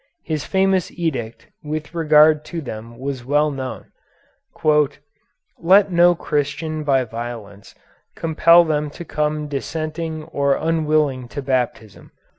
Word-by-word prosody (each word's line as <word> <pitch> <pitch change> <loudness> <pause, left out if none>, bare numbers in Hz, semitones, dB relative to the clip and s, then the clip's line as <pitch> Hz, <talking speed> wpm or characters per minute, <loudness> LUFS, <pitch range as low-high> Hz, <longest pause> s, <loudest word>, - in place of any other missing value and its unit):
His 155 -2 -3
famous 190 -2 +1
edict 130 -10 -4 0.2
with 155 +1 -5
regard 155 -2 +4
to 170 - -5
them 115 -4 -8
was 135 -1 -5
well 145 +4 +1
known: 130 -2 -7 1.7
"Let 190 +3 +5
no 175 0 +5
Christian 155 +1 -2
by 135 -3 +2
violence 115 -4 -8 0.4
compel 170 +1 +5
them 150 -2 -1
to 170 - -7
come 150 0 -2
dissenting 155 +2 -4
or 140 -2 0
unwilling 155 -5 0
to 140 +3 -6
Baptism. 125 -5 -3
150 Hz, 115 wpm, -20 LUFS, 130-160 Hz, 1.7 s, Let